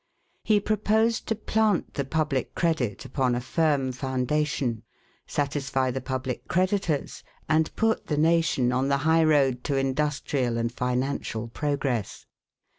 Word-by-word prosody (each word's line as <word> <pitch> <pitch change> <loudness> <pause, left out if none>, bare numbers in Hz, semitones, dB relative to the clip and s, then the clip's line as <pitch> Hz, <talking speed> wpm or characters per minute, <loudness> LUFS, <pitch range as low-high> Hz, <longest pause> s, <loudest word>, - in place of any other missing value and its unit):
He 215 -1 +3
proposed 215 +2 +1
to 225 - 0
plant 215 -2 0
the 140 - -1
public 145 -2 -1
credit 140 - 0
upon 130 -3 0
a - - 0
firm 140 0 +1
foundation, 130 -1 -1 0.5
satisfy 135 -2 -1
the 130 +1 -3
public 130 -2 -4
creditors, 185 -4 0 0.2
and 155 +1 +1
put 225 0 0
the 150 - -1
nation 160 -5 +2
on 130 +2 +1
the 140 0 +2
high 160 0 +4
road 135 -5 +3
to 140 - 0
industrial 135 -2 0
and 115 0 -1
financial 125 -2 -2
progress. 140 -5 -2
140 Hz, 130 wpm, -26 LUFS, 130-160 Hz, 0.5 s, high